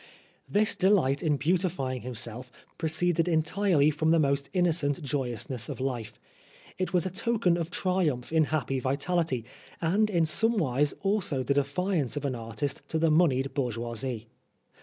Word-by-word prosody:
This 210 +1 +2
delight 175 -8 +3
in 150 -3 +1
beautifying 160 -5 0
himself 120 +1 -6 0.3
proceeded 165 +1 +1
entirely 160 -1 +2
from 155 +2 0
the 165 - +5
most 140 -2 +1
innocent 165 -4 +1
joyousness 125 -3 -3
of - - -5
life. 125 -4 -4 0.6
It 185 - -1
was 180 -2 +2
a 185 - -2
token 210 -3 +1
of 170 -1 -2
triumph 170 -9 0
in 160 -1 +4
happy 140 -3 -1
vitality, 140 -1 -1 0.3
and 200 +6 +2
in 170 -5 +2
somewise 155 - +1
also 195 -9 0
the 140 - +1
defiance 145 - 0
of 145 - -3
an 135 - 0
artist 120 +4 -4
to 160 - -2
the 160 0 +3
moneyed 140 -5 +3
bourgeoisie. 120 -2 -3
150 Hz, 145 wpm, -28 LUFS, 130-175 Hz, 0.6 s, the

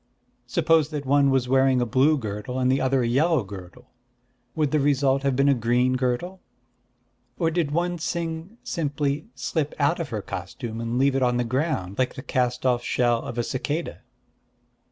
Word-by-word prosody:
Suppose 160 -2 +2
that 150 -3 -5
one 140 +1 +4
was 135 -2 +1
wearing 130 0 +3
a 120 - +1
blue 135 +7 +3
girdle, 105 +1 -5
and 130 0 +2
the 135 - +1
other 130 -1 +2
a - - 0
yellow 150 +3 +2
girdle, 100 +6 -11 0.6
would 150 -3 +1
the 155 - +2
result 140 -1 +2
have 140 -2 0
been 140 +2 +3
a 140 - +6
green 125 +1 +1
girdle?... 130 +9 -2 1.0
Or 165 -2 +1
did 165 -3 0
one 175 +3 -1
Ts'ing 165 +4 -4
simply 145 0 -2
slip 155 -3 -2
out 160 +4 +1
of 165 -4 -3
her 110 -4 -4
costume, 110 +6 -6
and 115 +1 -2
leave 135 +1 +3
it 135 - +1
on 125 -1 +2
the 125 - +1
ground, 120 - -2
like 130 - 0
the 130 - -7
cast 125 -3 -1
off 125 -2 +2
shell 120 -1 +1
of 120 - -7
a 120 - +1
cicada?" 145 +7 -3
135 Hz, 185 wpm, -25 LUFS, 125-150 Hz, 1.0 s, a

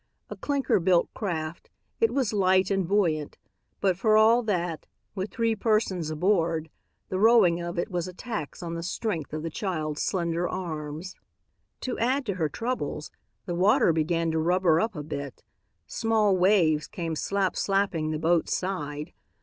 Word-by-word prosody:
A - - -4
clinker 280 -7 0
built 175 0 +2
craft, 165 -5 -4 0.3
it 455 - +3
was 260 -6 0
light 190 -1 +3
and 195 -3 +1
buoyant, 165 -7 0 0.4
but 190 -2 +3
for 215 +3 +3
all 225 +3 +6
that, 175 -7 -2 0.3
with 190 +1 -3
three 230 -2 0
persons 205 -7 0
aboard, 165 -1 0 0.4
the 185 - -2
rowing 205 -6 +5
of 170 0 -5
it 175 - -2
was 175 -1 -2
a 185 - -8
tax 200 - -6
on 170 -1 -4
the 165 - -4
strength 175 -2 -3
of 155 0 -4
the 165 - -3
child's 155 -5 -3
slender 170 -2 -1
arms. 160 0 -5 0.7
To 255 - -3
add 255 +4 +1
to 200 - -1
her 165 -4 -1
troubles, 225 - -3 0.3
the 175 - -3
water 195 +2 +4
began 165 +1 0
to 160 - 0
rubber 170 0 +3
up 220 -2 -1
a 150 - -5
bit. 140 -3 -6 0.4
Small 220 -3 +2
waves 175 -5 +3
came 165 -2 -4
slap 195 +3 0
slapping 195 -6 0
the 155 - -1
boat's 165 +2 +1
side. 150 -6 -4
180 Hz, 165 wpm, -27 LUFS, 160-205 Hz, 0.7 s, all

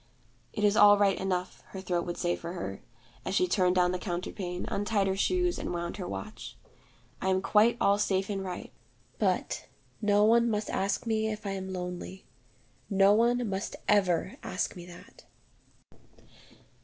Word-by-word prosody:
'It 210 - -3
is 205 0 +4
all 205 0 +8
right 200 -1 +2
enough,' 185 -1 -2
her 190 - -5
throat 180 -2 -2
would 175 - -4
say 175 -1 0
for 170 +1 -7
her, 180 - -5 0.4
as - - -3
she 365 - +3
turned 185 - +2
down 180 -1 +3
the 180 - -2
counterpane, 180 0 -4
untied 205 0 0
her 190 0 0
shoes, 355 - +1
and - - -4
wound 170 +3 -4
her 185 - -5
watch. 95 0 -7 0.6
'I 190 - 0
am 190 0 +2
quite 220 +4 +4
all 200 +1 +3
safe 195 -1 +1
and 195 -2 -3
right. 180 -2 -6 0.5
But - - -1 0.3
no 205 -1 +3
one 235 +2 +4
must 210 -1 -2
ask 195 +5 -1
me 220 -1 0
if 215 0 -7
I 200 - -2
am 190 -1 -5
lonely. 180 +1 -6 0.6
No 195 0 +5
one 240 +2 +2
must 195 -1 -3
ever 190 -3 +2
ask 185 -1 -3
me 175 -1 -10
that.' 175 -1 -14
195 Hz, 170 wpm, -29 LUFS, 180-210 Hz, 0.6 s, all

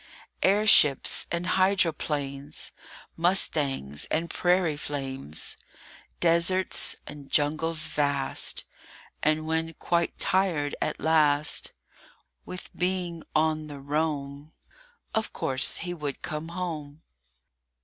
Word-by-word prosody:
AIRSHIPS 195 -8 +5
and 170 +1 -1
hydroplanes, 150 -7 0 0.4
Mustangs 145 - +1
and 165 +1 -2
prairie 175 -3 +2
flames! 135 - -5 0.6
Deserts 175 +2 +3
and 145 -2 -10
jungles 155 +3 +2
vast, 140 -2 -1 0.6
And, 155 0 +1
when 160 +1 -1
quite 170 -1 -1
tired 170 -7 +2
at - - -1
last 150 -2 +3 0.7
With 180 - -8
being 180 -2 -1
on 155 0 +1
the 145 -2 -8
roam, 145 0 -3 0.6
Of 220 0 -1
course, 130 0 +1
he 175 +1 -4
would 150 -5 -5
come 155 +1 -4
home. 165 -4 -6
155 Hz, 95 wpm, -27 LUFS, 145-170 Hz, 0.7 s, AIRSHIPS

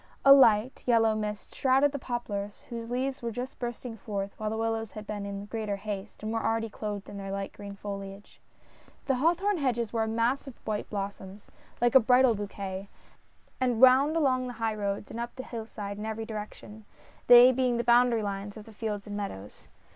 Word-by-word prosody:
A 275 - +11
light, 235 -2 +5
yellow 225 -2 +4
mist 210 -1 -4
shrouded 270 +2 +3
the 285 - -4
poplars, 205 -5 -4
whose 230 -1 -5
leaves 260 +2 -2
were 235 - -2
just 250 +4 -6
bursting 240 -1 -5
forth, 200 -1 -4
while 215 0 -2
the 220 - -3
willows 225 -1 -2
had 215 0 -8
been 205 -1 -5
in 200 0 -5
greater 215 -1 -3
haste, 205 +1 -6
and 215 +1 -2
were 225 - -1
already 225 -1 0
clothed 205 -1 -5
in 205 - -8
their 195 -1 -6
light 195 0 -4
green 200 -1 -9
foliage. 200 0 -8 0.6
The 265 -2 +1
hawthorn 350 +8 +2
hedges 240 -5 -1
were 225 - +1
a 220 - 0
mass 230 +5 0
of 265 - -9
white 210 -1 -3
blossoms 200 -1 -6
— - - -29
like 240 -1 +3
a 265 - +9
bridal 250 +1 +5
bouquet 200 -2 -5 0.4
— - - -36
and 245 -3 +1
wound 265 +4 +6
along 255 -5 +2
the 245 - -5
highroad 215 -3 -2
and 235 - -6
up 235 0 -5
the 260 - -6
hillside 215 -4 -6
in 210 - -4
every 220 0 -4
direc 215 -1 -6
tion, 215 +1 -13 0.4
they 245 +1 +9
being 250 -1 +1
the 235 - 0
boundary 240 -1 +4
lines 200 +1 -4
of 210 - -10
the 225 - -13
fields 210 -2 -4
and 205 -1 -6
meadows. 105 - -7
225 Hz, 205 wpm, -28 LUFS, 205-245 Hz, 0.6 s, A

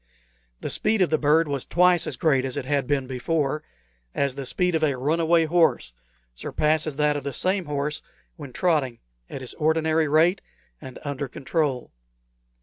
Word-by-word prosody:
The - - -4
speed 215 -2 +2
of 175 - -1
the 155 - +2
bird 155 +2 +3
was 140 -3 -2
twice 180 -1 +3
as - - -4
great 135 -5 +2
as 135 +1 -3
it 140 - -3
had 140 -2 0
been 140 -2 0
before 140 +3 -1 0.5
as 140 -2 0
the 135 -1 -6
speed 180 +5 0
of 160 - +1
a 140 -4 +1
runaway 165 +4 +2
horse 160 - +2 0.4
surpasses 155 - -1
that 150 0 +2
of 145 - -4
the 140 0 -4
same 185 +3 0
horse 150 +1 -2 0.3
when 145 -5 -9
trotting 145 -6 0 0.3
at 135 - -7
his 130 - -5
ordinary 160 0 +1
rate 165 +6 +3 0.4
and 130 - -9
under 140 -1 -3
control. 135 0 -2
150 Hz, 170 wpm, -24 LUFS, 135-165 Hz, 0.5 s, bird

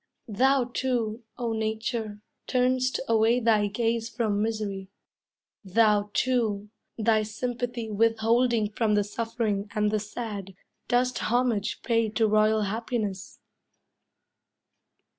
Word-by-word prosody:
Thou, 265 +4 +3
too, 240 -3 -1 0.2
O 235 -2 -2
Nature, 220 -1 -3 0.2
turn'st 255 0 +1
away 230 +2 +3
thy 220 -3 +3
gaze 230 +2 -1
From 215 -4 -1
misery; 210 -3 -3 0.7
thou, 210 +1 +3
too, 220 -5 0 0.3
thy 220 -1 +3
sympathy 235 +1 -4
Withholding 225 +1 +2
from 215 -1 +1
the 205 - +3
suffering 220 -1 -2
and 210 -1 +2
the 215 - +1
sad, 205 -3 -6 0.3
Dost 250 +1 +1
homage 240 -4 0
pay 230 -2 +1
to 220 +1 +1
royal 215 0 +3
happiness. 215 -2 -3
220 Hz, 105 wpm, -27 LUFS, 210-235 Hz, 0.7 s, Thou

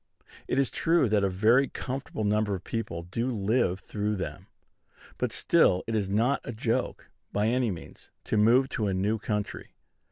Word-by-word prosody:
It - - -1
is 135 -2 +2
true 165 -5 +2
that 105 -1 +2
a 100 - +2
very 115 +9 +4
comfortable 130 -4 -5
number 105 -1 +1
of 90 - -8
people 85 -7 -4
do 115 +8 -3
live 105 -3 +1
through 105 0 -2
them; 95 - -6 0.7
but - - 0
still 90 - +3
it 115 - -4
is 105 -3 0
not 115 +7 +1
a 120 - -6
joke, 115 +1 -2 0.2
by 105 +1 0
any 120 +1 +1
means, 90 -4 -9
to - - -2
move 115 +5 +5
to 110 - -1
a 95 - 0
new 105 +4 0
country. 105 -1 -4
110 Hz, 180 wpm, -28 LUFS, 100-120 Hz, 0.7 s, move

